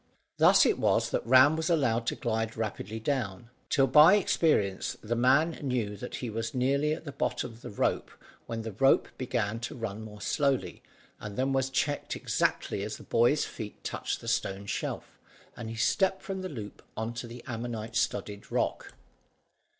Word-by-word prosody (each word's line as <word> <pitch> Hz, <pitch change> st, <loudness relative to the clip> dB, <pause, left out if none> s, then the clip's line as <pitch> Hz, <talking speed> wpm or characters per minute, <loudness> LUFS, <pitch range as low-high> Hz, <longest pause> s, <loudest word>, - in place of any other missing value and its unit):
Thus -, -, +6 dB
it -, -, +2 dB
was -, -, +2 dB
that -, -, 0 dB
Ram 130 Hz, +5 st, +7 dB
was 160 Hz, +2 st, -1 dB
allowed 120 Hz, -8 st, +1 dB
to -, -, 0 dB
glide 115 Hz, -1 st, -2 dB
rapidly 110 Hz, 0 st, -4 dB
down, 115 Hz, -3 st, -3 dB, 0.2 s
till 135 Hz, -, +4 dB
by 155 Hz, +7 st, +8 dB
experience 150 Hz, -, +1 dB
the 115 Hz, +2 st, -1 dB
man 135 Hz, +7 st, +3 dB
knew 125 Hz, -7 st, -1 dB
that 125 Hz, +4 st, -7 dB
he 125 Hz, -, -4 dB
was 115 Hz, +2 st, -4 dB
nearly 140 Hz, +4 st, +2 dB
at 160 Hz, -, -7 dB
the 145 Hz, -, -5 dB
bottom 130 Hz, -3 st, -2 dB, 0.9 s
when 115 Hz, -1 st, -4 dB
the 110 Hz, -, -5 dB
rope 135 Hz, +7 st, +3 dB
began 115 Hz, -4 st, -1 dB
to 115 Hz, -, -5 dB
run 110 Hz, -3 st, -5 dB
more 105 Hz, -1 st, -10 dB
slowly, 140 Hz, +4 st, 0 dB, 0.4 s
and 105 Hz, 0 st, -7 dB
then 135 Hz, +1 st, +1 dB
was 135 Hz, 0 st, +1 dB
checked 145 Hz, +2 st, -1 dB
exactly -, -, -1 dB
as 105 Hz, +1 st, -4 dB
the -, -, -12 dB
boy's 120 Hz, +6 st, +3 dB
feet 105 Hz, -3 st, -8 dB
touched -, -, -3 dB
the -, -, -10 dB
stone 95 Hz, +1 st, -1 dB
shelf, -, -, -4 dB, 0.4 s
and 110 Hz, -, -6 dB
he 115 Hz, -, -6 dB
stepped 190 Hz, -, +1 dB
from 190 Hz, -1 st, -4 dB
the 185 Hz, -, -4 dB
loop 110 Hz, -9 st, -8 dB, 0.2 s
on 110 Hz, +1 st, -2 dB
to 120 Hz, 0 st, -6 dB
the 120 Hz, +1 st, -10 dB
ammonite 115 Hz, -2 st, -5 dB
studded 105 Hz, -3 st, -2 dB
rock. -, -, -1 dB
120 Hz, 175 wpm, -29 LUFS, 110-140 Hz, 0.9 s, by